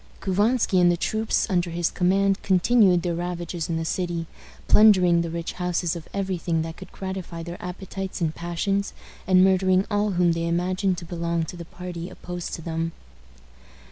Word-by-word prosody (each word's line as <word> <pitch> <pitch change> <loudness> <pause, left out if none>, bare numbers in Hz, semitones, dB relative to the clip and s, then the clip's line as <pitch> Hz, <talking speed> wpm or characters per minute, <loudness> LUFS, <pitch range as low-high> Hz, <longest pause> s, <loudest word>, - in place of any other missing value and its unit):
Couvansky 205 0 +2
and 175 0 +5
the 175 - 0
troops 220 +5 0
under 180 -4 0
his 170 0 -1
command 195 +2 +2
continued 190 -1 +4
their 175 -1 -1
ravages 175 -1 -4
in 165 - 0
the 165 - -2
city, 170 -1 -2 0.4
plundering 185 -5 +6
the 170 - -3
rich 170 0 -4
houses 180 -1 -1
of 165 -2 -8
every 190 -2 -2
thing 165 -1 0
that 165 0 -6
could - - -12
gratify 190 -3 -6
their 170 +1 -8
appetites 190 +1 -5
and 160 -3 0
passions, 195 +4 -2 0.3
and 185 -1 +6
murdering 190 0 +3
all 205 0 +1
whom 175 -1 +3
they 165 0 -1
imagined 185 +2 0
to 170 - -7
belong 170 -1 -2
to 160 - -7
the 170 -1 -8
party 175 0 -7
opposed 175 -1 -6
to 165 - -9
them. 165 0 -3
180 Hz, 175 wpm, -24 LUFS, 170-190 Hz, 0.4 s, plundering